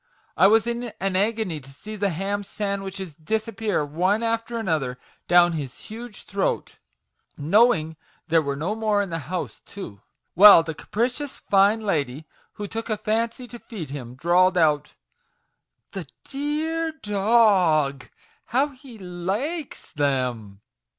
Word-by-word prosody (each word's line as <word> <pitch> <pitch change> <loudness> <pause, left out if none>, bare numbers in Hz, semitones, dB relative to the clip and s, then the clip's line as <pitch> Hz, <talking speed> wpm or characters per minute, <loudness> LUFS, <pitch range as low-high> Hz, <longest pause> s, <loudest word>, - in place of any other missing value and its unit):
I 185 - +6
was 220 +1 +4
in 235 0 -3
an 195 -1 -1
agony 205 -4 0
to 135 -1 -16
see 210 +11 -9
the 200 -1 0
ham 195 +4 -2
sandwiches 195 -3 -4
disappear 215 +1 -2
one 185 +9 +1
after 230 +1 -1
another 155 - -1 0.3
down 175 0 +6
his 145 -6 -5
huge 225 -1 -9
throat 195 0 -2 0.6
(knowing 160 -1 +3 0.3
there 165 0 +4
were 140 -2 -2
no 165 +9 -2
more 215 -2 +1
in 195 - -7
the 165 - -2
house, 180 -1 -4
too), 110 - -9 0.3
while 200 -3 +9
the 165 -1 -4
capricious 250 - -3
fine 200 +3 +3
lady 150 - -1 0.3
who 205 -2 -6
took 225 +3 -5
a 215 - 0
fancy 230 +4 -1
to 240 - -9
feed 175 - -8
him, 125 -4 -7
drawled 180 +5 +3
out, 150 -3 +2 0.5
' - - -52
the - - -6 0.2
d 295 +2 -2
e - - -1
a 330 0 -1
r 320 - -2
d 210 -10 -8
o 195 -9 +4
g! 130 - -15 0.4
how 265 +6 +1
he 260 -3 -14
li 200 - -3
kes - - -16
them 125 - -1
195 Hz, 155 wpm, -24 LUFS, 160-225 Hz, 0.6 s, while